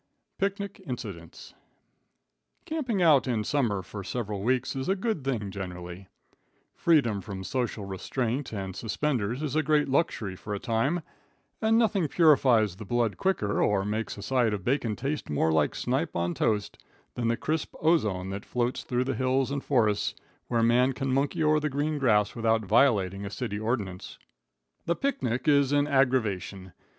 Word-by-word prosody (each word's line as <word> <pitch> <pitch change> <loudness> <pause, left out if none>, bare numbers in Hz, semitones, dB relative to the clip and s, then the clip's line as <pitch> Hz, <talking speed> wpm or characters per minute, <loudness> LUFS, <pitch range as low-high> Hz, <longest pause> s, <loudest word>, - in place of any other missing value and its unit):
Picnic 200 0 -2
Incidents. 100 - -7 1.1
Camping 255 - -1
out 145 -6 +5
in 115 -4 0
summer 110 -7 0
for 100 +3 -7
several 105 -1 -4
weeks 125 +4 0
is 135 +5 -3
a 195 - +3
good 200 - -2
thing 115 -7 -2
generally. 90 -1 -7 0.7
Freedom 130 -12 +2
from 95 0 -7
social 120 -2 -2
restraint 120 +7 -3
and 95 -3 -5
suspenders 120 +1 -1
is 150 -2 -2
a 155 - +4
great 150 -1 +2
luxury 130 - 0
for 105 +2 -5
a - - -4
time, 130 - 0 0.6
and 220 0 +3
nothing 205 -7 +2
purifies 130 - +4
the - - -7
blood 115 0 0
quicker, 185 - 0
or 100 -2 +2
makes 105 +1 -3
a 100 - -7
side 120 -2 +1
of 100 -2 -8
bacon 120 -4 0
taste 140 +6 -3
more 75 +2 +1
like 80 -2 +2
snipe - - -1
on 85 0 0
toast, 105 +1 -1 0.3
than 120 -1 -2
the 115 0 +1
crisp 155 +5 -2
ozone 105 - +1
that 100 +2 -5
floats 125 0 -1
through 125 0 -1
the 135 +1 -2
hills 130 +1 +1
and 140 -1 -2
forests 110 -7 +1 0.3
where 115 -2 +1
man 125 +3 +4
can 135 0 -2
monkey 140 +3 +1
o'er 155 0 +4
the 150 0 -1
green 145 +2 -1
grass 105 -6 +3
without 115 -2 +1
violating 100 -4 +3
a 100 - -4
city 105 -1 -4
ordinance. 105 -5 -3 0.7
The 170 - +2
picnic 135 - -2
is 140 -2 +4
an 145 0 +3
aggravation. 110 - 0
120 Hz, 165 wpm, -28 LUFS, 100-145 Hz, 1.1 s, out